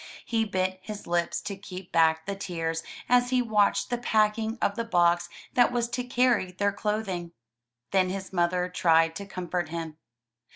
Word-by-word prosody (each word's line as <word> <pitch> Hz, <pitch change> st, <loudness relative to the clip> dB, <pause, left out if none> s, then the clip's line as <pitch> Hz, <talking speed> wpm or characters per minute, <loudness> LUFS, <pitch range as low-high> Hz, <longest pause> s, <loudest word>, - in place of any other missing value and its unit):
He 225 Hz, -1 st, +1 dB
bit 185 Hz, -2 st, -1 dB
his 210 Hz, +1 st, -7 dB
lips 170 Hz, 0 st, 0 dB
to 200 Hz, -, -5 dB
keep 190 Hz, -2 st, -9 dB
back 160 Hz, -1 st, +3 dB
the 200 Hz, -, -3 dB
tears 165 Hz, -4 st, -3 dB, 0.3 s
as 245 Hz, 0 st, +4 dB
he 255 Hz, 0 st, +2 dB
watched 215 Hz, -3 st, +2 dB
the 245 Hz, -, 0 dB
packing 220 Hz, 0 st, +1 dB
of 200 Hz, -, +1 dB
the 230 Hz, -, -1 dB
box 175 Hz, -5 st, +2 dB, 0.2 s
that 245 Hz, -1 st, +4 dB
was 240 Hz, -1 st, 0 dB
to 250 Hz, +1 st, -2 dB
carry 245 Hz, -6 st, +2 dB
their 200 Hz, +2 st, +1 dB
cloth 210 Hz, +1 st, -2 dB
ing. 175 Hz, -2 st, -4 dB, 0.6 s
Then 185 Hz, -1 st, +3 dB
his 190 Hz, 0 st, -5 dB
mother 180 Hz, 0 st, +1 dB
tried 165 Hz, -2 st, +3 dB
to 200 Hz, -, -7 dB
comfort 180 Hz, -3 st, -3 dB
him. 165 Hz, -1 st, -5 dB
190 Hz, 175 wpm, -27 LUFS, 175-220 Hz, 0.6 s, as